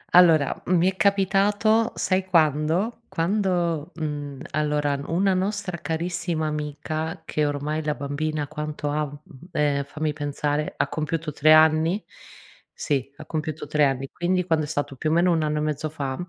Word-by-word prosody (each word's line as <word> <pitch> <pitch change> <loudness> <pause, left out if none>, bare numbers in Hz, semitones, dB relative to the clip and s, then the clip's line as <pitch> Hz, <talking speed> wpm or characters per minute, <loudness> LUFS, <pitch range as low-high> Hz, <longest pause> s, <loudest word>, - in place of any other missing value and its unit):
Allora, 165 -5 +5
mi 180 0 +4
è - - -14
capitato 205 +3 +3
sai 185 0 +1
quando? 165 - +2
Quando, 175 -4 0
mhmm, 145 -4 -4
allora 150 -2 0
una 190 +4 +2
nostra 190 -1 -2
carissima 170 0 -2
amica, 150 +1 -4
che 150 - 0
ormai 145 +2 -2
la 150 -1 -1
bambina 145 +1 -2
quanto 150 0 -4
ha, 150 +1 0
mhmm, 145 +2 -13
ehm, 145 -1 +1
fammi 150 +2 -3
pensare, 145 0 -2
ha - - +1
compiuto 155 0 -3
3 155 +2 +4
anni? 160 +4 +5 0.7
Sì, 140 -2 -2
ha - - -9
compiuto 155 -1 -4
3 150 0 +3
anni. 135 0 -1
Quindi 180 +1 0
quando 160 -3 +1
è - - -9
stato? 145 -2 -3
Più 155 - -1
o - - +2
meno 175 +2 +4
1 165 -2 +2
anno 150 0 0
e - - -1
mezzo 155 0 -2
fa, 140 -3 -3
155 Hz, 160 wpm, -24 LUFS, 150-175 Hz, 0.7 s, Allora